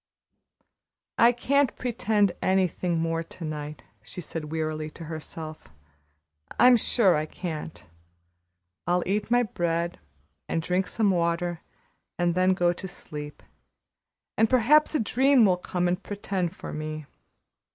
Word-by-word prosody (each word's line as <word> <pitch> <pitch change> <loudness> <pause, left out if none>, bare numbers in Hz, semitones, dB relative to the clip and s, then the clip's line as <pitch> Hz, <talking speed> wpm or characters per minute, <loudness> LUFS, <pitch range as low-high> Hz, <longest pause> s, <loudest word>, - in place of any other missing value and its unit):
"I 235 +1 +7
can't 265 +1 +1
pretend 215 -5 +1
anything 185 -2 +1
more 165 0 0
to 165 +1 -9
night," 150 -1 -6 0.2
she 115 +11 -9
said 155 -2 -5
wearily 155 -1 -2
to 165 - -11
herself. 155 0 -7 0.9
"I'm 250 0 +8
sure 220 -4 +4
I 155 +1 -1
can't. 160 -2 -6 1.0
I'll 175 0 +2
eat 205 +3 -1
my 245 +1 +4
bread 170 -4 -2 0.5
and - - 0
drink 180 +3 0
some 215 -1 +1
water 170 -1 0 0.6
and 175 -1 +1
then 185 +1 +3
go 175 -1 +2
to 190 - -7
sleep, 150 -4 -9 0.9
and 220 0 +3
perhaps 290 +6 +4
a - - +3
dream 255 +2 +4
will 185 -2 +3
come 180 0 -1
and 180 +2 -1
pretend 195 -4 -3
for - - -8
me. 155 0 -5
180 Hz, 130 wpm, -26 LUFS, 160-210 Hz, 1.0 s, I'm